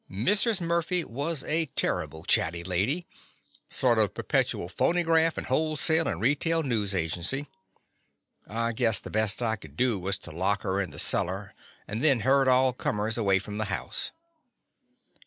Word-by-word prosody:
Mrs. 200 - +2
Murphy 170 +1 +1
was 145 +4 -3
a 160 +1 +1
terrible 80 -9 -2
chatty 85 +1 +2
lady 100 - 0 0.3
— - - -43 0.3
sort 120 -3 +2
of 105 -3 +1
perpetual 85 - -1
phonygraft, 165 - +2
and - - -4
wholesale 155 +2 +2
and 85 - -3
retail 155 - +1
news 105 -7 -1
agency. 90 - -1 1.0
I 115 +2 -1
guessed 115 -3 +1
the - - -8
best 110 +2 +1
I 110 -1 0
could - - -15
do 125 -5 +1
was 95 +2 -1
to 85 - -8
lock 95 +5 -1
her 95 +1 -1
in 95 - -4
the 75 - -11
cellar 95 +6 +1 0.3
and 110 +4 -4
then 135 -7 +4
herd 135 +3 +3
all 130 0 +4
comers 110 -2 -2
away 100 -4 +2
from 105 +2 -6
the 110 - 0
house. 100 -1 -3
115 Hz, 160 wpm, -27 LUFS, 100-155 Hz, 1.0 s, then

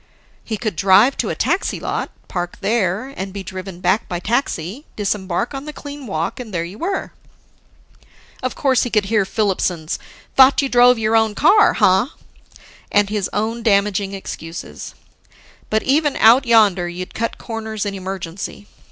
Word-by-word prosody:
He 220 - -4
could 215 -3 -3
drive 200 - +5
to - - -1
a - - -2
taxi - - 0
lot, - - -3 0.2
park 175 -1 -4
there, 205 +2 0
and 190 +1 -5
be 200 0 -6
driven 185 -1 -8
back 200 +4 +1
by 175 - -2
taxi, 225 - -2
disembark 200 +2 -2
on 270 +1 -6
the 300 - -7
clean 285 -2 -9
walk, 165 +1 -3
and 240 -4 -7
there 170 -3 -1
you 180 +5 -9
were. 380 +3 -2 1.3
Of 255 - -3
course, 260 -4 +2
he 245 - -1
could 215 -3 +1
hear 210 -1 +2
Filipson's 185 -6 -1 0.4
"Thought 270 +1 +6
you 275 - -1
drove 245 0 +6
your 220 0 +1
own 220 -2 +2
car, 420 - +5
ha?" 190 +9 +3 0.8
and 205 0 +2
his 210 -3 -1
own 220 +3 -2
damaging 200 -2 +1
excuses. 170 -3 -7 0.7
But 220 0 +1
even 295 +1 +2
Out 235 +4 +5
Yonder, 205 -6 +4
you'd 180 +1 -7
cut 230 +1 -3
corners 220 -2 -5
in 200 - -3
emergency. 190 +1 -6
210 Hz, 160 wpm, -19 LUFS, 190-235 Hz, 1.3 s, Thought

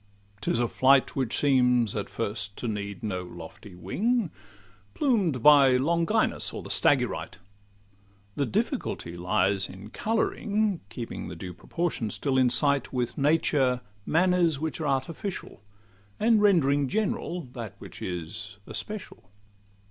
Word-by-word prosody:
'Tis 110 - 0
a 120 0 +1
flight 130 +3 +3
Which 130 -4 -1
seems 125 -5 +3
at 105 - -3
first 100 -2 -2
to 120 - -3
need 100 -2 -4
no 95 -4 -2
lofty 90 +2 -11
wing, 200 - 0 0.6
Plumed 190 - +1
by 140 -3 +7
Longinus 165 +5 +1
or - - -6
the - - -7
Stagyrite: - - +1 1.0
The 140 - 0
difficultly 85 -5 -2
lies 95 +2 +1
in 95 +3 -11
colouring 215 - 0
(Keeping 115 0 -6
the - - -7
due 90 -1 -7
proportions 140 - -3
still 135 -2 +1
in 130 -1 +4
sight) 140 0 +2
With 125 -2 -2
nature 140 -4 +2 0.2
manners 170 - +2
which 160 +1 -3
are 150 - -1
artificial, 145 - -3 0.6
And 220 -1 +4
rend'ring 145 -9 +4
general 185 -1 -1
that 115 -6 -7
which - - -11
is 100 +5 -6
especial. 115 - -6
130 Hz, 130 wpm, -27 LUFS, 105-170 Hz, 1.0 s, by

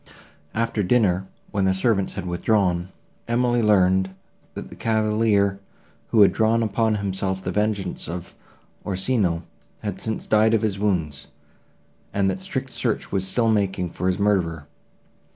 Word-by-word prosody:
After 115 -1 0
dinner, 95 -3 +2 0.2
when 100 -2 +1
the 95 0 +2
servants 100 -1 +1
had - - -5
withdrawn, 90 0 +1 0.4
Emily 120 0 +2
learned, 95 -3 +3 0.5
that - - -7
the - - -9
cavalier, 105 -3 +1 0.5
who 110 - +4
had 100 - +6
drawn 115 +1 +2
upon 110 +1 +1
himself 95 -1 -2
the 90 - -2
vengeance 105 -2 -1
of 85 +1 -6 0.5
Orsino, 95 -3 0 0.4
had 105 -3 -4
since 110 -1 -2
died 110 +1 +4
of 110 - 0
his 100 -3 -1
wounds, 80 -8 -1 0.9
and 95 -1 +2
that 95 0 -5
strict - - -4
search - - -2
was 95 -1 0
still 115 +4 +2
making 95 -4 0
for 90 - -3
his 90 -1 +1
murderer. 90 -7 0
100 Hz, 145 wpm, -23 LUFS, 95-110 Hz, 0.9 s, had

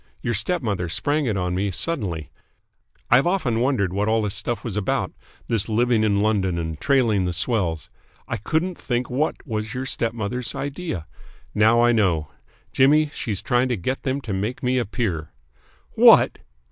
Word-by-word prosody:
Your 115 - 0
stepmother 110 - -1
sprang 145 - 0
it 105 -4 0
on 90 -1 -1
me 100 +3 0
suddenly. 95 - -2 0.8
I've 130 +7 +5
often 140 -12 0
wondered 115 -8 +1
what 100 +2 0
all 110 0 +2
this 105 -2 -1
stuff 120 -3 -2
was 115 -5 -4
about, 105 -3 -1 0.4
this 115 -1 -1
living 115 0 +2
in 100 -2 +2
London 100 -5 +1
and 80 -2 -4
trailing 115 -9 +2
the 90 - -1
swells. 85 - -1 0.4
I 120 - -2
couldn't 160 - -2
think 125 0 -2
what 145 +5 -1
was 110 -2 -4
your 130 +1 -3
stepmother's 115 0 -2
idea. 140 - -4 0.5
Now 110 +3 +4
I 120 - +5
know. 90 -9 +1 0.4
Jimmy, 150 +3 +4
she's 105 -6 -4
trying 125 0 +1
to 120 - 0
get 130 +9 -3
them 135 +1 -2
to 110 -6 -5
make 105 +8 -3
me 125 +1 +2
a 120 - -1
peer!" 95 - -3 0.6
"What!" - - +6
115 Hz, 170 wpm, -23 LUFS, 100-130 Hz, 0.8 s, What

